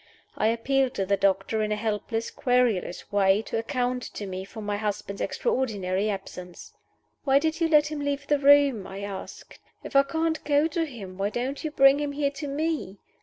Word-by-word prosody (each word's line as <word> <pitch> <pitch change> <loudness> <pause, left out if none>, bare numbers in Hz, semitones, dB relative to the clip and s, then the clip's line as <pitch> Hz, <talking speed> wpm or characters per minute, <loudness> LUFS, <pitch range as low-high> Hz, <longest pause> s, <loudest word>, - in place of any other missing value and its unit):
I 215 - +1
appealed 260 +3 +1
to 195 - -1
the 200 +1 +2
doctor, 195 +2 +1
in 215 0 -1
a - - +2
helpless, 225 +1 -2
querulous 245 -8 0
way, 200 +1 +3
to 225 - -3
account 250 +1 -1
to 205 - -5
me 190 0 -5
for 220 +3 -10
my 205 -1 -2
husband's 205 -1 -4
extraordinary 210 - -1
absence. 180 -3 -7 0.5
"Why 275 -1 +4
did 320 +3 0
you 330 - +4
let 300 -1 +4
him 305 - -3
leave 285 0 -2
the 290 0 +2
room?" 280 -7 +5
I 195 +1 -7
asked. 200 -1 -8 0.2
"If - - -9
I 275 - +8
can't 320 +3 -1
go 290 +1 +3
to 330 -1 -1
him, 195 -8 -9
why 200 +1 +1
don't 255 +7 -3
you 310 - -1
bring 275 -1 +5
him 290 -1 -2
here 280 -1 0
to 280 +1 -6
me?" 295 - -2
245 Hz, 195 wpm, -26 LUFS, 200-285 Hz, 0.5 s, I